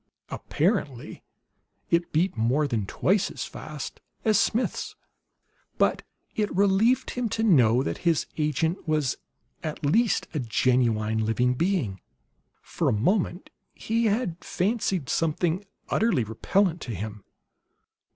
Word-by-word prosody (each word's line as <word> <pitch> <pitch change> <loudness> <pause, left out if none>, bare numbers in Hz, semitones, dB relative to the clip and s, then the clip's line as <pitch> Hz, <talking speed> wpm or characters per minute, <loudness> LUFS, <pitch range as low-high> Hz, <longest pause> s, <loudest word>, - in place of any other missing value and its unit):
Apparently 150 - -2 0.7
it 170 0 +2
beat 170 +2 +1
more 125 +7 +1
than 110 -7 -2
twice 195 - +1
as - - -5
fast - - -8 0.2
as 215 -2 +4
Smith's. 230 +3 0 0.8
But - - +2 0.3
it 210 -1 0
relieved 200 +6 +3
him 245 -2 -2
to 220 - -1
know 130 - +5
that - - -3
his 170 -3 +1
agent 160 +4 -1
was 150 -5 +1 0.4
at 155 -1 -4
least 215 +8 +2
a 155 - -1
genuine 110 -3 +1
living 120 +3 +1
being. 135 - -1 0.6
For - - -1
a - - +2
moment 180 - 0 0.2
he 230 +1 0
had 205 -5 0
fancied 190 - -1
something 165 +5 0 0.3
utterly 220 - +2
repellent 165 - 0
to 115 - -5
him. 105 +1 -6
160 Hz, 120 wpm, -26 LUFS, 125-200 Hz, 0.8 s, know